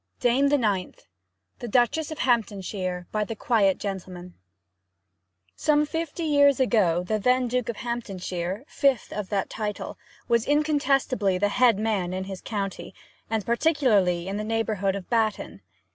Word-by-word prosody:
DAME 260 +3 +3
THE 290 - +4
NINTH 205 -7 -2 0.5
THE 240 - -5
DUCHESS 250 +7 +2
OF 315 - -6
HAMPTONSHIRE 195 -6 -1
By 215 0 0
the 225 +2 -5
Quiet 205 -4 +2
Gentleman 180 -3 -6 1.2
Some 300 0 +2
fifty 325 +2 -4
years 285 -3 +4
ago, 195 -9 +2
the 215 +4 -1
then 250 +3 +2
Duke 250 0 -1
of 235 - -2
Hamptonshire, 195 -4 -4
fifth 275 -4 +1
of 210 -2 -4
that 200 -2 -1
title, 210 -2 -5 0.3
was 235 -1 +2
incontestibly 280 -9 +1
the 205 +2 +1
head 240 -1 +4
man 205 -5 -1
in 185 0 -3
his 190 -1 -7
county, 195 -5 -5 0.3
and 220 -3 -1
particularly 230 - +2
in 195 +1 -3
the 210 - -3
neighbourhood 215 -3 -1
of 195 -3 -6
Batton. 225 -3 -1
220 Hz, 145 wpm, -25 LUFS, 195-250 Hz, 1.2 s, THE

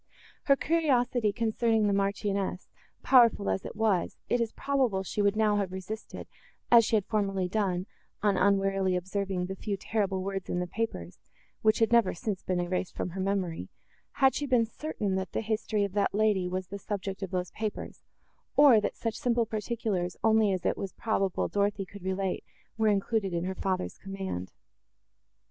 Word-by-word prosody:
Her 275 - +6
curiosity, 255 -8 +1
concerning 225 0 +1
the 205 - +2
Marchioness, 195 -1 -1 0.3
powerful 230 - +5
as 95 - -2
it - - -7
was, 210 -5 +1
it 245 - +2
is 230 -1 -1
probable 260 -9 0
she 205 - -2
would 200 0 +2
now 215 -1 +3
have 195 -3 -1
resisted, 190 +4 -7 0.4
as 235 -1 +8
she 225 - +1
had 205 -3 +1
formerly 195 -4 0
done, 185 -2 -1 0.4
on 205 -2 +3
unwarily 195 -1 +2
observing 190 0 -2
the 190 +1 -5
few 200 +1 -3
terrible 195 -2 -1
words 195 -1 -4
in 180 - -1
the 180 - -1
papers, 175 - -4 0.4
which 215 0 +4
had 225 0 +2
never 235 -6 +4
since 195 +2 -3
been 185 -1 -1
erased 175 +1 -2
from 180 - -3
her 190 +2 -4
memory, 185 - -2 0.4
had 265 -1 +4
she 290 - -2
been 245 -3 +3
certain 220 -5 -3
that 190 0 -4
the - - 0
history 215 -1 -1
of 200 -2 -3
that 200 -1 +1
lady 210 -4 +2
was 185 0 -4
the 200 +1 -6
subject 195 -1 -4
of 195 - -3
those 180 0 -2
papers, 215 -1 -5 0.5
or, 275 -7 +7
that - - -2
such 230 -1 -2
simple 240 0 +1
particulars 215 -4 -2
only 220 -2 +4
as 185 -2 -2
it - - +1
was 195 -2 -4
probable 195 -4 0
Dorothée 200 -1 0
could 200 +1 -11
relate 190 0 -2 0.3
were 220 0 +1
included 200 -2 +1
in 170 - -1
her 190 - -2
father's 185 -1 -2
command. 190 - -5
200 Hz, 180 wpm, -29 LUFS, 190-220 Hz, 0.5 s, as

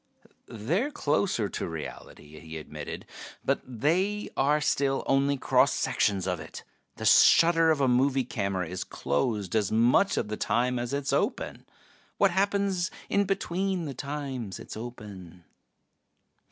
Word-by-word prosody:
"They're 165 - -1
closer 150 - 0
to - - -4
reality," 75 -1 -9
he 80 -1 -8
admitted. 80 - -7 0.4
"But - - +1
they 170 - -1
are 145 +3 +2
still 140 -2 0
only 140 +1 +2
cross - - +3
sections 100 -3 0
of 90 -2 -1
it. - - -9 0.3
The - - -6
shutter 165 -1 +6
of 155 -3 +2
a 135 - +3
movie 130 +2 +2
camera 100 -6 -2
is 90 +2 -4
closed 100 - -2
as 105 -3 +1
much 120 - +3
of - - 0
the 105 0 -4
time 125 +1 0
as 120 0 -3
it 140 0 -1
is 135 - -2
open. - - -2 0.5
What 200 -2 +4
happens 195 -1 +1 0.2
in 200 0 +2
between 190 -1 -1
the 140 - -5
times 135 -7 -5
it's - - -9
open? 100 -7 -9
130 Hz, 145 wpm, -28 LUFS, 105-165 Hz, 0.5 s, shutter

